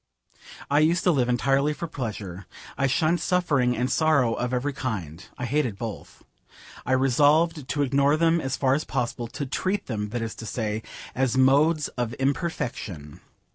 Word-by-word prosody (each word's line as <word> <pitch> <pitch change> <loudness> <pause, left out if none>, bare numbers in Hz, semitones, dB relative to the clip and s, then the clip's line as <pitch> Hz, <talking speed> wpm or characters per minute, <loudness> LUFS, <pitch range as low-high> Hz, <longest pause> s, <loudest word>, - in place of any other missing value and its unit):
I 145 - +3
used 165 +3 +3
to 180 - +4
live 130 -6 +1
entirely 135 +4 +2
for 170 +3 -5
pleasure. 105 - -6 0.3
I 135 - +1
shunned 155 +5 +1
suffering 145 -11 +1
and 125 +2 +1
sorrow 140 -7 +3
of 125 +1 -2
every 130 +3 -1
kind. 95 - -4
I 125 - -3
hated 125 -5 0
both. 110 -1 -7 0.6
I 130 - +2
resolved 145 +4 +3
to 145 -1 +1
ignore 140 +2 +3
them 165 +1 +3
as 135 -1 -2
far 130 -1 +2
as 150 +3 0
possible: 120 -2 -3
to 145 +5 -5
treat 190 +9 -2
them, 105 -4 -3
that 120 +1 -3
is 115 - -4
to 110 - -7
say, 110 -2 -2 0.3
as 130 0 0
modes 150 +4 +4
of 120 -1 -3
imperfection. 125 - -3
135 Hz, 170 wpm, -25 LUFS, 120-150 Hz, 0.6 s, to